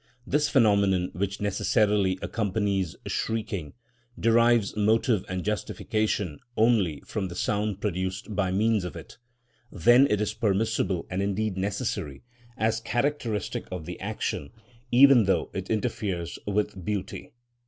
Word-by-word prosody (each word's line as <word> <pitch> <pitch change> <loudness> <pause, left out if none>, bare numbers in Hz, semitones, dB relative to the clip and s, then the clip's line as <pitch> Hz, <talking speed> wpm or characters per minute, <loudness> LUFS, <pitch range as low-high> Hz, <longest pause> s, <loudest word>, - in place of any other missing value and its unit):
This 150 +2 +1
phenomenon, 100 -7 +3
which 100 +3 -3
necessarily 100 -1 +1
accompanies 100 -4 -1
shrieking, 105 -8 -3 0.5
derives 115 -2 +3
motive 110 0 +2
and 90 -1 -3
justification 105 -5 -1 0.2
only 110 -9 +2
from 105 -4 -3
the 85 - -8
sound 105 +1 -1
produced 95 +1 -3
by 95 -2 0
means 105 +1 +2
of 90 -4 -6
it; - - -11 0.5
then 120 +9 +5
it 105 - +1
is 105 0 -1
permissible 100 -4 0
and 95 +1 -1
indeed 100 +1 -1
necessary, 95 -7 -3 0.3
as 110 0 +1
characteristic 120 -2 -2
of 90 -4 -5
the 90 +1 -7
action, 95 -8 -3 0.4
even 125 -2 +7
though 95 - +1
it 95 0 -5
interferes 100 - -2
with 105 -2 -1
beauty. 100 0 -4
105 Hz, 125 wpm, -27 LUFS, 95-110 Hz, 0.5 s, even